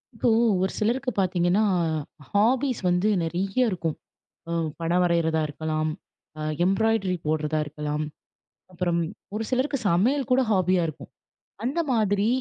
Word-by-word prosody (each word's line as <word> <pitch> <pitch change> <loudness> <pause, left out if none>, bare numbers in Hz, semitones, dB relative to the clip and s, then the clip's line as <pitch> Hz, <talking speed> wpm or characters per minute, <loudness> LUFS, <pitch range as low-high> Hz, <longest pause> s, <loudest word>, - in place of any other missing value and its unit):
இப்போ 240 - +1 0.3
ஒரு 190 - +1
சிலருக்கு 250 +4 0
பார்த்தீங்கன்னா, 180 +2 +2 0.7
ஹாபிஸ் 245 +5 +2
வந்து 180 +4 +2
நெறைய 175 +4 -2 0.2
இருக்கும். 170 -5 -2 0.5
அம் 165 -2 0
படம் 170 +2 +1
வரையிறதா 165 -2 +2
இருக்கலாம், 155 +1 -2 0.5
அ - - -6 0.2
எம்ப்ராய்டரி 195 -1 +2
போடுறதா 155 0 0
இருக்கலாம், 150 0 -3 0.7
அப்பறம் 175 -1 0 0.3
ஒரு 220 +1 -2
சிலருக்கு 265 +3 +1
சமையல் 235 +10 +2
கூட 255 +1 +4
ஹாபியா 185 -2 +3
இருக்கும். 155 - -9 0.5
அந்த 265 +8 -1
மாதிரி 205 -3 +2
185 Hz, 120 wpm, -25 LUFS, 165-225 Hz, 0.7 s, கூட